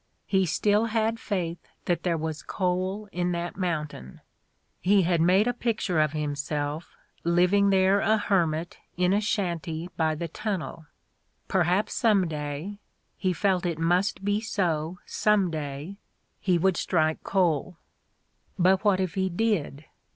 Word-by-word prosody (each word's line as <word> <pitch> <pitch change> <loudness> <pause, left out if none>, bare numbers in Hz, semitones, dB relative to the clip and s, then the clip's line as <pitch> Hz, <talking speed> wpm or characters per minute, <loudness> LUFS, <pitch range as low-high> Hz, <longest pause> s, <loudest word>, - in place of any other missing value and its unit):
"He 190 -2 +2
still 210 +6 +2
had 225 0 0
faith 175 -6 -3 0.3
that 175 - 0
there 170 -2 0
was 155 -1 -4
coal 185 +3 -2
in 180 0 -1
that 170 0 -3
mountain. 150 - -4 0.6
He 195 +1 +4
had 170 -1 +2
made 185 +5 +4
a 245 - +1
pic 235 -2 -1
ture 180 -7 0
of 155 -1 +2
himself 145 +1 -3 0.3
living 180 +4 +3
there 190 +1 +4
a 220 +2 +3
hermit 170 -5 0 0.2
in 180 +1 +3
a 205 - +2
shanty 175 -6 -2
by 160 -1 +1
the 170 +2 -4
tunnel.... 165 -3 -4 0.6
Perhaps 190 +3 +1
some 205 -6 +3
day 150 +6 -5 0.2
— - - -31
^he 185 -1 +1
felt 190 -2 +1
it 170 -3 -1
must 180 +4 +1
be 205 +1 +1
so 175 -6 -1
some 205 -4 +2
day 150 +4 -5 0.2
— - - -46
he 180 -3 +2
would 185 +1 +2
strike 155 -3 0
coal. 180 -2 0 0.8
But 190 +1 +3
what 200 -3 +3
if 185 -3 -1
he 190 -1 0
did? 175 -7 -1
180 Hz, 150 wpm, -26 LUFS, 160-200 Hz, 0.8 s, He